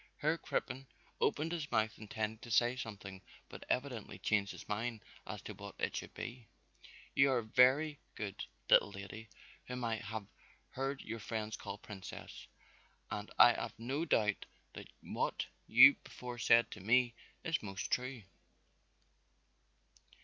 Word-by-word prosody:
Herr 155 +2 +2
Crippen 130 +2 -3 0.3
opened 155 +3 +1
his 160 -4 -3
mouth 110 -2 +1
intending 110 0 -3
to 120 - -10
say 120 +2 +4
something 100 -6 -7 0.3
but - - -9
evidently 125 -4 -2
changed 100 -2 +1
his - - -10
mind 115 +1 -2 0.3
as - - -6
to - - -6
what - - -9
it - - -1
should - - -5
be. 120 -1 -6 0.7
"You 140 0 +5
are 125 -3 +2
very 130 +6 +4 0.2
good, 100 -3 -4 0.2
little - - +6
lady, 100 +3 -8 0.4
whom 125 0 -4
I 115 -1 0
haf 110 0 -5 0.5
heard 135 +1 -3
your 115 +1 -5
friends 110 0 -3
call 100 - -6
Princess, 100 -3 -9 0.6
and 105 0 -4
I 120 -1 +9
haf 115 - -4
no 130 +7 -2
doubt 105 -10 +1 0.3
that - - -8 0.2
what - - -1 0.2
you - - +10
before 125 -1 -7
said 115 0 +5
to - - -7
me 120 +5 +3 0.3
is 165 0 0
most 100 0 -5
true." 125 -2 -1
115 Hz, 145 wpm, -35 LUFS, 105-125 Hz, 0.7 s, you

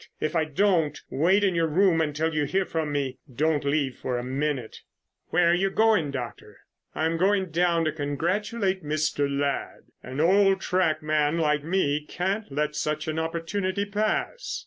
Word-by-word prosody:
If 155 - -2
I 160 -1 +2
don't, 160 -1 +1
wait 185 +8 +3
in 195 -2 +3
your 165 -1 +1
room 170 +1 +3
until 160 +1 -1
you 150 -1 +1
hear 190 +6 0
from 160 -3 -2
me. 140 -3 -2
Don't 150 +4 +1
leave 140 -1 +1
it - - -24
for 125 -1 -2
a 120 - -3
minute." 135 -2 -3 0.5
"Where 170 0 +3
are - - +4
you 190 +2 +2
going, 215 -7 +3
Doctor?" 125 -4 -7 0.4
"I'm 160 +1 0
going 190 0 +1
down 170 0 +2
and 155 - -1
congratulate 185 - -1
Mr. 150 -1 0
Ladd. 140 0 -2 0.2
An 130 +3 -7
old 195 +3 +4
track 180 -5 0
man 155 +1 +1
like 150 -3 +1
me 150 -4 0
can't 190 +4 -3
let 150 +2 -1
such 155 0 -2
an 155 0 -1
opportunity 185 +4 -2
pass." 215 - -2
160 Hz, 170 wpm, -26 LUFS, 150-185 Hz, 0.5 s, are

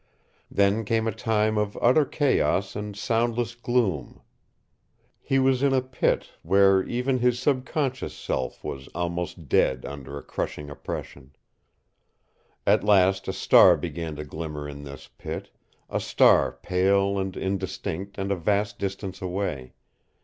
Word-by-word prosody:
Then 100 +3 +2
came 115 +1 0
a - - +1
time 110 -2 +1
of 105 -1 -2
utter 135 +5 +4
chaos 130 -10 +1
and 105 -1 -5
soundless 115 +2 0
gloom. 120 - -1 1.0
He 135 - 0
was 130 -1 +3
in 140 -1 +3
a 130 - +3
pit, 130 0 -1
where 95 +2 +4
even 125 +4 -1
his 125 0 +2
subconscious 130 0 -1
self - - -4
was 65 0 -6
almost 85 -2 -3
dead 65 0 +2
under 70 0 -7
a 70 - -8
crushing 75 -1 -5
oppression. 70 -1 -7 1.3
At - - +4
last 95 -2 +3
a 95 - -1
star - - +6
began 80 -2 -5
to 75 +1 -6
glimmer 75 -1 -6
in 70 0 -8
this 70 -1 -10
pit, - - -6 0.4
a - - -2
star - - +4
pale 95 +8 +1
and 95 -1 -3
indistinct 95 0 -4
and 95 0 -2
a - - +2
vast 100 +4 0
distance 95 -1 -4
away. 90 -8 -3
100 Hz, 140 wpm, -25 LUFS, 85-115 Hz, 1.3 s, star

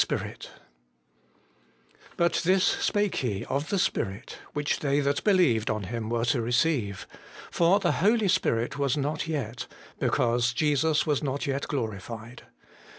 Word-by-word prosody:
Spirit* - - -3 0.9
' - - -29
But 170 0 +2
this 185 +2 +3
spake 205 -1 +1
He 105 -7 -2
of 140 +3 -2
the 200 - 0
Spirit, 100 - -2
which 145 -1 -1
they 140 -1 +1
that 140 0 0
believed 170 - +3
on 110 -1 -1
Him 110 +3 -4
were 120 0 0
to 120 0 +1
receive: 120 - 0 0.5
for 175 +4 +4
the - - +1
Holy 215 +1 +3
Spirit 140 - 0
was 140 +1 +1
not 150 +3 -2
yet: 130 -7 -4 0.3
because 120 0 +1
Jesus 150 +2 +2
was 150 -3 +1
not 140 -1 -2
yet 140 0 -2
glorified.' 115 - -5
140 Hz, 145 wpm, -27 LUFS, 115-160 Hz, 0.9 s, for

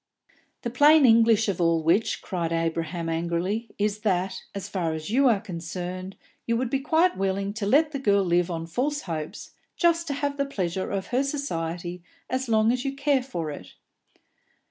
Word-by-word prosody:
"The 235 - -3
plain 290 +3 +6
English 225 -2 +5
of 190 -3 -1
all 165 -1 +2
which," 180 +8 +1
cried 170 -4 -2
Abraham 165 0 -2
angrily, 170 +7 -1
"is, 210 0 0
that, 190 -3 -1
as 200 0 -4
far 180 -5 -2
as 160 +4 -5
you 270 +3 +4
are 225 -5 +4
concerned, 180 0 -6 0.3
you 230 0 +2
would 250 0 -2
be 270 - +1
quite 325 +6 +2
willing 195 +1 -1
to 210 -2 -3
let 300 +7 +4
the 280 - -3
girl 200 -6 +3
live 175 0 +2
on 165 -1 -3
false 270 - -1
hopes, 160 -4 -6 0.2
just 335 -1 +2
to 280 - -2
have 285 0 -2
the 280 - +1
pleasure 185 -7 -2
of 195 -1 -3
her 250 +2 +2
society 175 - -3 0.3
as 260 -1 -1
long 220 0 +4
as 250 0 -1
you 275 -1 -3
care 275 -1 +2
for 170 - -4
it." 145 - -10
200 Hz, 185 wpm, -26 LUFS, 175-260 Hz, 0.3 s, plain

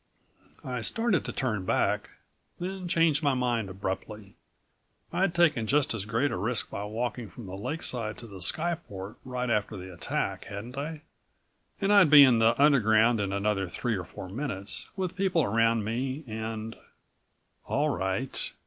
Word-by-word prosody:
I 125 -2 -3
started 225 - +1
to - - -3
turn 110 -7 -1
back, - - 0 0.5
then 185 0 -4
changed 165 -4 +3
my 140 -3 +2
mind 120 -5 0
abruptly. 95 +2 -5 0.8
I'd 180 -2 +1
taken 155 -10 +3
just 145 0 +2
as 105 -4 -4
great 115 +7 0
a - - -2
risk 110 +5 -1
by 100 - -4
walking 115 +1 -3
from 115 +5 -10
the 95 0 -7
lakeside 115 -1 -2
to 120 - -8
the 100 -4 -10
skyport 115 - -2
right 125 -1 -3
after 105 -1 0
the 95 0 -8
attack, 85 - -2
hadn't 110 +6 -7
I? 150 +2 -5 0.8
And 200 0 +2
I'd 200 -6 +7
be 145 -1 +10
in 125 -4 +5
the 115 +2 +3
Underground 115 -5 +5
in 100 -1 -1
another 100 -1 0
three 115 +5 -2
or 90 - -3
four 90 +1 -9
minutes, 100 -2 -3
with 185 -2 -3
people 185 -4 +2
around 115 0 +2
me 130 +7 -2
and 110 0 -5 0.9
All 150 +2 +1
right. 115 +1 -1
115 Hz, 160 wpm, -28 LUFS, 105-145 Hz, 0.9 s, be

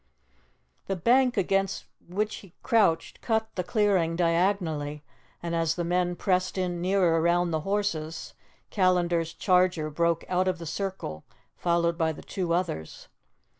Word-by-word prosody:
The 195 - -1
bank 245 +7 +3
against 195 0 0 0.2
which 210 +4 -2
he 190 -4 -15
crouched 200 -8 +2
cut 220 -1 0
the 180 - -2
clearing 190 -5 +1
diagonally, 165 -4 0 0.4
and 170 0 -3
as 165 -1 +1
the 175 - -2
men 175 +1 0
pressed 185 +1 0
in 175 -2 -1
nearer 180 -3 +2
round 170 0 +2
the 160 - +1
horses, 165 -4 -2 0.4
Callandar's 175 -4 +2
charger 180 -4 +2
broke 170 +2 0
out 185 +1 +1
of 185 -1 0
the 165 - -8
circle 175 - -4 0.3
followed 170 -1 +1
by 160 -1 +1
the - - -11
two 180 -3 -3
others. 170 - -3
175 Hz, 140 wpm, -27 LUFS, 165-195 Hz, 0.4 s, bank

